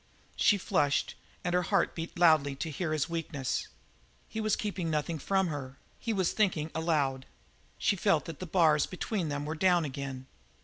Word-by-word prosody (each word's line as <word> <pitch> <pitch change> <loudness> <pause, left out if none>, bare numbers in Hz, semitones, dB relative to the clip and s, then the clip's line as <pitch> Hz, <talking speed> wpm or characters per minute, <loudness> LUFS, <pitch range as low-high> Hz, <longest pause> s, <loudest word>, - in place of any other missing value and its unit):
She 205 - +4
flushed, 165 -7 +1 0.3
and 175 - -1
her 180 - +3
heart 175 - +1
beat 165 +1 -6
loudly 155 -5 +4
to 160 +4 -4
hear 160 +2 -2
his 155 -2 0
weakness. 160 -5 -3 0.6
He 220 - -4
was 215 -1 +2
keeping 195 -5 -3
nothing 155 +1 -1
from 190 +4 +1
her; 140 -3 -6 0.2
he 230 - -2
was 190 -5 +1
thinking 175 -7 +1
aloud; 145 -5 0 0.5
she - - +2
felt 180 -4 +2
that 165 -3 -7
the 185 - -5
bars 155 -4 +4
between 185 -2 -2
them 145 0 -3
were 155 - -2
down 175 0 +3
again. 135 -2 -5
160 Hz, 175 wpm, -30 LUFS, 145-185 Hz, 0.6 s, She